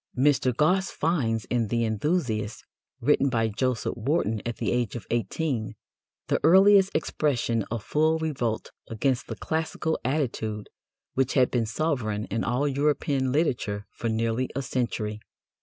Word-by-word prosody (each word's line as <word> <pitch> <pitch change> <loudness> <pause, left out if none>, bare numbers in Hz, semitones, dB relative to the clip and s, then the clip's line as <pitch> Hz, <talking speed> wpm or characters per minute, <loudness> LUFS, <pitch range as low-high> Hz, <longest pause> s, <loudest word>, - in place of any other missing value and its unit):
Mr. 130 -1 +3
Gosse 180 +9 +2
finds 125 -10 0
in 120 -3 0
The 115 +2 0
Enthusiast, 110 - -1 0.4
written 140 - +3
by 115 -3 +1
Joseph 125 +2 -1
Warton 115 -3 0
at 120 - -3
the - - -1
age 120 -3 0
of 115 -6 -6
eighteen, 115 - -1 0.5
"the - - +1
earliest 195 +3 +6
expression 130 -7 0
of 115 -1 -3
full 155 +2 +2
revolt 130 -9 -2 0.2
against 120 +3 -1
the 115 - -5
classical 160 +4 -2
attitude 115 -6 -2 0.4
which 130 -1 0
had 130 -3 +4
been 120 -3 0
sovereign 115 -6 -1
in 115 +2 0
all 135 +4 +1
European 140 -1 +1
literature 120 -9 0
for 115 - -3
nearly 115 +3 0
a 135 - -1
century." 115 -4 -2
125 Hz, 140 wpm, -26 LUFS, 115-150 Hz, 0.5 s, earliest